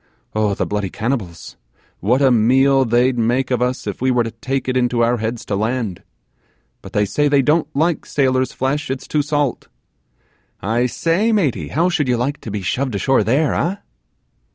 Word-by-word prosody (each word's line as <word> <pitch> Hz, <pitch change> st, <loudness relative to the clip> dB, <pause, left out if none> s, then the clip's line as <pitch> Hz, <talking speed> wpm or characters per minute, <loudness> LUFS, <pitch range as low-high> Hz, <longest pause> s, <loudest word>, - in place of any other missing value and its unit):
Oh, 105 Hz, -2 st, +1 dB
the -, -, -1 dB
bloody 105 Hz, -2 st, -2 dB
cannibals, 105 Hz, -, -4 dB, 0.4 s
what 125 Hz, +8 st, +2 dB
a 135 Hz, -, +5 dB
meal 130 Hz, +4 st, +4 dB
they'd 120 Hz, +2 st, +2 dB
make 120 Hz, +3 st, 0 dB
of 125 Hz, -1 st, +1 dB
us 125 Hz, +1 st, -1 dB
if 105 Hz, +1 st, -5 dB
we 130 Hz, -, +2 dB
were 125 Hz, -2 st, +2 dB
to 115 Hz, -, -5 dB
take 135 Hz, 0 st, -3 dB
it 130 Hz, -, -1 dB
into 125 Hz, -2 st, +2 dB
our 120 Hz, +1 st, +2 dB
heads 115 Hz, +1 st, -4 dB
to 100 Hz, -, -2 dB
land! 110 Hz, -2 st, -2 dB, 0.8 s
but 95 Hz, -, -12 dB
they 105 Hz, -2 st, +2 dB
say 145 Hz, +8 st, +1 dB
they 140 Hz, -1 st, +3 dB
don't 150 Hz, +3 st, +2 dB
like 160 Hz, +2 st, 0 dB
sailor's 130 Hz, -2 st, +1 dB
flesh, 145 Hz, +4 st, -2 dB
it's 130 Hz, 0 st, -4 dB
too 150 Hz, -, +1 dB
salt. 145 Hz, -3 st, -1 dB, 0.9 s
I 115 Hz, +5 st, 0 dB
say, 170 Hz, -, +1 dB
maty, 140 Hz, -, 0 dB
how 165 Hz, -, +1 dB
should 155 Hz, -6 st, 0 dB
you 125 Hz, -1 st, +2 dB
like 135 Hz, +5 st, -2 dB
to -, -, -7 dB
be 105 Hz, -1 st, -4 dB
shoved 125 Hz, +6 st, -1 dB
ashore 135 Hz, +7 st, +2 dB
there, 140 Hz, +6 st, +1 dB
eh? 175 Hz, +4 st, 0 dB
125 Hz, 190 wpm, -19 LUFS, 115-140 Hz, 0.9 s, a